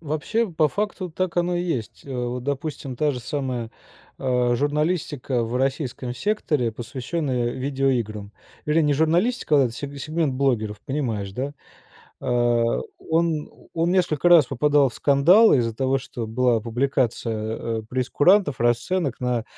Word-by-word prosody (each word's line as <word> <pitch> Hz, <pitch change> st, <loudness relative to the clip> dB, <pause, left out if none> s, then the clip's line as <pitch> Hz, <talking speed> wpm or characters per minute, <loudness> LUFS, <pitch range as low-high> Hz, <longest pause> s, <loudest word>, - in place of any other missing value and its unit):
Вообще, 165 Hz, +9 st, -1 dB
по 155 Hz, -1 st, +3 dB
факту 200 Hz, -1 st, -3 dB
так 180 Hz, +2 st, -3 dB
оно 175 Hz, 0 st, +1 dB
и 175 Hz, -, -1 dB
есть. 130 Hz, -, -4 dB
Э, 135 Hz, -, -6 dB
вот 125 Hz, 0 st, -3 dB
допустим 140 Hz, -2 st, -4 dB
та 150 Hz, +1 st, +2 dB
же 125 Hz, -, -5 dB
самая, 125 Hz, -4 st, -3 dB, 0.5 s
а, 125 Hz, -2 st, +1 dB
журналистика 145 Hz, -3 st, -1 dB
в 115 Hz, +2 st, -3 dB
российском 130 Hz, -2 st, -2 dB
секторе, 150 Hz, -, 0 dB
посвященная 125 Hz, +2 st, -3 dB
видеоиграм. 125 Hz, -6 st, -1 dB, 0.4 s
Вернее, 155 Hz, +2 st, +3 dB
не 145 Hz, -1 st, +2 dB
журналистика, 160 Hz, -, +2 dB
а 120 Hz, -, -1 dB
сег 140 Hz, +4 st, -7 dB
сегмент 155 Hz, -1 st, -1 dB
блогеров, 110 Hz, -6 st, 0 dB
понимаешь, 115 Hz, -9 st, -2 dB
да? 130 Hz, +6 st, -2 dB
Да. 145 Hz, -, -8 dB, 0.7 s
А 120 Hz, -1 st, +1 dB, 0.2 s
он 160 Hz, -2 st, 0 dB, 0.3 s
он 165 Hz, +1 st, +1 dB
несколько 175 Hz, -3 st, +2 dB
раз 165 Hz, -6 st, +7 dB
попадал 145 Hz, +1 st, +3 dB
в 120 Hz, -, -12 dB
скандал 170 Hz, +11 st, +5 dB
из-за 115 Hz, -4 st, +1 dB
того, 135 Hz, +2 st, +1 dB
что 120 Hz, -3 st, -6 dB
была 120 Hz, 0 st, +2 dB
публикация, 115 Hz, -2 st, -1 dB
э, -, -, -12 dB
прейскурантов, 145 Hz, -, +2 dB
расценок 130 Hz, +5 st, 0 dB
на 125 Hz, -2 st, -1 dB
135 Hz, 145 wpm, -23 LUFS, 120-155 Hz, 0.7 s, раз